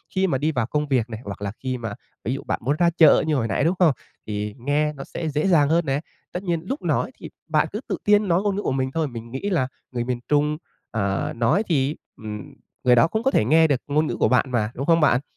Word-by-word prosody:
khi 190 0 +3
mà 135 -7 +1
đi 155 +4 0
vào 125 -6 0
công 150 +4 -1
việc 125 -4 +1
này 110 -2 -6
hoặc 100 0 -7
là 100 -1 -2
khi 130 -1 -2
mà 110 -4 -5 0.3
ví 120 - 0
dụ 135 - -5
bạn - - -2
muốn 140 +5 +1
ra 175 -1 +5
chợ 160 -3 +7
như 155 - +2
hồi 115 -4 0
nãy, 95 - 0
đúng 170 +4 +2
không? 165 -6 +5 0.3
Thì 105 0 -3
nghe 150 +4 0
nó 135 - -8
sẽ 160 - -4
dễ 150 +4 0
dàng 155 -6 +4
hơn 170 +1 +2
nè. 135 0 0 0.3
Tất 180 +2 -5
nhiên 170 -3 -1
lúc 275 - -2
nói - - 0
thì - - -8 0.2
bạn - - +2
cứ - - -3
tự - - -2
tin 210 0 +4
nói 175 +1 +3
ngôn 205 -2 0
ngữ 205 - -2
của - - -1
mình 130 0 -1
thôi, 160 +1 0
mình 115 -2 -8
nghĩ 135 +10 -3
là 145 -9 +1 0.2
người 120 -2 -2
miền 125 0 -2
Trung, 150 +1 +2 0.3
ờ, 100 -3 -1
nói 120 - +2
thì, 150 -6 0 0.2
ừm, 105 -1 -7 0.3
người 125 -1 +5
đó 120 - +5
cũng 220 +6 -2
có 270 - +3
thể - - +3
nghe 160 +6 +5
được 140 -5 0
ngôn 150 +2 +1
ngữ - - -2
của - - +4
bạn 125 - +3
mà, 110 -3 0
đúng 135 - -3
không 165 +1 +4
bạn? 135 -4 +4
145 Hz, 275 wpm, -23 LUFS, 120-165 Hz, 0.3 s, chợ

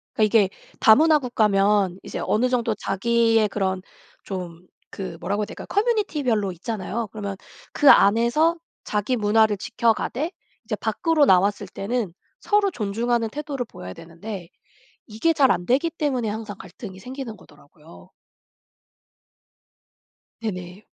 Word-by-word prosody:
그러니까 220 - +2 0.2
이게 195 -2 +3 0.3
다문화 305 +8 +6
국가면 205 -6 +2
이제 - - -6
어느 245 +4 +1
정도 235 -3 0
자기의 225 +2 +2
그런 190 -2 -1 0.4
좀 180 -2 -7 0.3
그 185 -3 -5
뭐라고 205 +1 -1
해야 - - -2
될까요? - - -10
커뮤니티별로 305 - +1
있잖아요. 210 +4 -4
그러면 200 -3 -5 0.3
그 290 - +5
안에서 235 - +5 0.3
자기 210 +4 -1
문화를 215 -1 +3
지켜가되 235 - -1 0.3
이제 215 -1 -2
밖으로 295 - +1
나왔을 195 -2 +3
때는 215 -3 -3 0.3
서로 415 -1 +2
존중하는 230 - -1
태도를 285 -1 -4
보여야 90 0 -9
되는데 170 - -9 0.6
이게 225 +9 +1
잘 275 -4 +4
안되기 250 - +1
때문에 275 -8 -1
항상 210 -1 -5
갈등이 190 -7 -10
생기는 250 0 -7
거더라고요. 150 +1 -18 2.3
네네. 185 -2 -6
220 Hz, 310 characters per minute, -23 LUFS, 195-250 Hz, 2.3 s, 다문화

